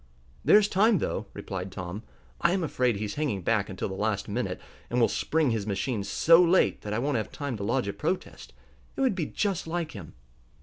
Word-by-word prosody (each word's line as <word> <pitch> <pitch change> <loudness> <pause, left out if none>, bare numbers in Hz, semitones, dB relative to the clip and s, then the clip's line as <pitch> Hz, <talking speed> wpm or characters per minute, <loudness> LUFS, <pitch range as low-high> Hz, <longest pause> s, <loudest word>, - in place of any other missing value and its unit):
"There's 210 0 +6
time 210 +3 +4
enough," 175 - -1
replied 95 -1 -5
Tom. 90 +2 -6 0.4
"I 170 - +3
am 190 -2 0
afraid 125 -6 +1
he's 100 0 -3
hanging 130 -11 -2
back 105 +1 +1
until 95 - -3
the 95 - -5
last 100 0 -1
minute, 120 +4 -2 0.3
and 120 - 0
will 115 - +5
spring 155 -5 +1
his 110 -2 -2
machine 100 +2 -1
so 165 - +5
late 180 +1 +3
that 105 - -6
I 105 - 0
won't 140 +2 0
have 110 - -3
time 140 -4 -4
to 100 - -5
lodge 120 +2 0
a 100 - -2
protest. 180 +5 -4 0.4
It - - -3
would 265 -5 +3
be 175 -5 -2
just 195 -6 -2
like 165 -1 -2
him." 95 -7 -10
120 Hz, 210 wpm, -27 LUFS, 100-165 Hz, 0.4 s, There's